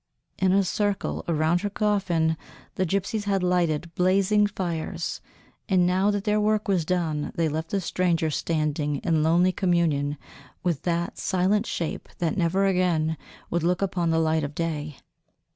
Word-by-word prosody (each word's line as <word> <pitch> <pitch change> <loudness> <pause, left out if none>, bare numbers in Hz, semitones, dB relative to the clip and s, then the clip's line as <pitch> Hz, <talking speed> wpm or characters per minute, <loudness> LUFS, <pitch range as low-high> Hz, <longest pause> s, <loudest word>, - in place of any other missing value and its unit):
In 190 -1 +3
a 195 +1 +4
circle 205 +1 -1
around 165 +1 +2
her 205 - -1
coffin 195 -7 +1 0.4
the 185 - -1
gypsies 200 +4 -1
had 195 -2 +1
lighted 170 -2 0
blazing 195 +4 +3
fires, 175 -5 -4 0.5
and 185 -2 +4
now 185 +3 +2
that 205 -1 0
their 210 0 +1
work 215 0 +1
was 185 -5 +1
done 160 -4 -1
they 165 -1 +1
left 160 +2 -3
the 200 - 0
stranger 170 -3 0
standing 150 -2 -1
in 165 -3 +2
lonely 170 +4 +4
communion 165 -6 +1 0.5
with 170 -6 0
that 170 0 -2
silent 195 +4 +1
shape 165 - -4
that 165 -3 -1
never 185 +2 +1
again 175 -4 +1 0.4
would 170 - +1
look 180 +4 +1
upon 180 -3 0
the 165 - +2
light 160 -1 +2
of 145 0 -5
day. 155 -4 -3
175 Hz, 160 wpm, -25 LUFS, 160-195 Hz, 0.5 s, a